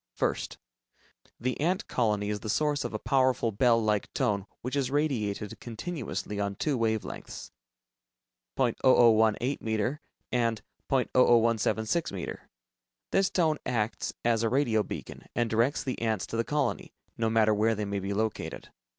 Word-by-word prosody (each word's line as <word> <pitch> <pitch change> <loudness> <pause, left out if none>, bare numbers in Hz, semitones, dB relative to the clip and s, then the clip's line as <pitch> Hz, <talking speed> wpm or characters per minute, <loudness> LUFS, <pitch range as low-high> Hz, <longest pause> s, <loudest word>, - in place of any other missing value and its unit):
First: - - -1 0.8
The 125 +2 -2
ant 185 +6 0
colony 105 -4 0
is 105 - -2
the 110 - -6
source 145 +4 +1
of - - -3
a - - -2
powerful 130 -4 +2
bell 115 +2 +4
like 105 -2 0
tone 100 -1 0
which 125 +3 -3
is 135 -3 0
radiated 115 -9 -1
continuously 120 - -5
on 100 -1 -1
two 145 +7 0
wave 110 -3 0
lengths, - - -8 1.1
.0018 120 -1 +4
meter, 110 +6 -1 0.3
and 115 -3 +1 0.3
.00176 120 +1 +2
meter. 95 - -6 0.6
This 195 -1 +3
tone 160 -4 +1
acts 115 -3 -2
as 115 -2 +3
a 115 - +1
radio 120 -4 +2
beacon, - - -7
and 120 -2 0
directs 115 +6 +2
the 130 -3 -4
ants 110 -4 0
to - - -6
the 115 - +1
colony, 150 +4 -2 0.2
no 115 -1 0
matter 110 -1 +4
where 110 +2 +2
they 105 0 -2
may 100 0 -2
be 100 +1 -4
located. 110 +1 -3
115 Hz, 150 wpm, -29 LUFS, 110-130 Hz, 1.1 s, bell